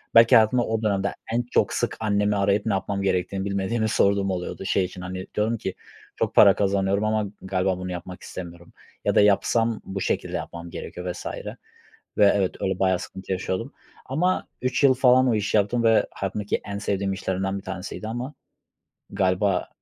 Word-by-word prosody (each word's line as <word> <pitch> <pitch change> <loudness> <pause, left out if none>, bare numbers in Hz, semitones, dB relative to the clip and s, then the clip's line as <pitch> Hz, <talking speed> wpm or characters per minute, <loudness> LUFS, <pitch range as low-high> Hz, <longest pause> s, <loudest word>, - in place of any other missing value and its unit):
belki 115 +2 +8
hayatımda 115 +2 +5
o 110 0 -1
dönemde 100 -1 0 0.2
en 120 +1 +1
çok, - - +2
sık - - -1
annemi 105 -1 +1
arayıp 100 +1 +1
ne 110 - +1
yapmam 100 +1 -2
gerektiğini 95 0 -1
bilmediğimi 100 +3 -1
sorduğum 100 -1 +2
oluyordu. 90 +1 -4
Şey 95 -1 +2
için, 90 0 -9
hani, 95 +1 -6
diyordum 110 +2 +1
ki: 95 - -4 0.4
"Çok - - -2
para - - +8
kazanıyorum 100 0 +1
ama 110 -1 +1 0.2
galiba 95 -1 0
bunu 90 0 -5
yapmak 90 +1 -7
istemiyorum 85 -1 -9 0.3
ya - - +1
da - - +6
yapsam 115 +2 +2
bu 95 0 -5
şekilde - - -1
yapmam 85 0 -7
gerekiyor" 90 +1 -6
vs. 90 - -9 0.9
Ve 100 -1 +6
evet, 95 -2 0
öyle 95 -1 -1
bayağı 95 -2 +2
sıkıntı 95 0 -8
yaşıyordum 95 +7 -2 0.3
ama 180 +8 0
3 125 +2 0
yıl 135 -1 +7
falan 130 0 +4
o 115 - +3
işi 105 0 +1
yaptım 110 +4 +1
ve 115 -1 +4
hayatımdaki 100 +1 -3
en 100 0 -4
sevdiğim 100 -1 -1
işlerimden 95 0 -2
bir 95 - -8
tanesiydi 95 +3 -6
ama 120 +6 -4 0.8
galiba 95 0 +1
100 Hz, 175 wpm, -24 LUFS, 95-110 Hz, 0.9 s, belki